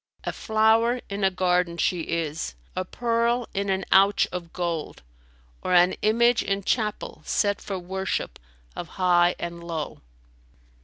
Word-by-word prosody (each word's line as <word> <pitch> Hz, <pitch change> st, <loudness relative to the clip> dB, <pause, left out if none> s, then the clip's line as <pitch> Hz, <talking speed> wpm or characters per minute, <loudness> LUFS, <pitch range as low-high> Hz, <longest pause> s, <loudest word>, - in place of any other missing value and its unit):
A -, -, -3 dB
flower 225 Hz, +2 st, +2 dB
in 200 Hz, 0 st, -3 dB
a 190 Hz, -, +5 dB
garden 180 Hz, -2 st, +1 dB
she 180 Hz, +1 st, +1 dB
is, 160 Hz, -, -3 dB, 0.2 s
a 185 Hz, -, -1 dB
pearl 235 Hz, +3 st, 0 dB
in 200 Hz, 0 st, -1 dB
an 190 Hz, 0 st, 0 dB
ouch 195 Hz, +1 st, +5 dB
of 175 Hz, -2 st, -6 dB
gold 170 Hz, -, -4 dB, 0.3 s
* -, -, -32 dB
Or 180 Hz, -, +1 dB
an 175 Hz, +1 st, +6 dB
image 235 Hz, +2 st, +3 dB
in 195 Hz, 0 st, -2 dB
chapel[FN#291] 215 Hz, 0 st, -2 dB
set 205 Hz, -1 st, +1 dB
for 195 Hz, -, -4 dB
worship 190 Hz, +1 st, -3 dB, 0.4 s
of 175 Hz, -, -5 dB
high 175 Hz, -1 st, +4 dB
and 170 Hz, 0 st, -6 dB
low. 165 Hz, -3 st, -5 dB
190 Hz, 150 wpm, -25 LUFS, 175-210 Hz, 0.4 s, an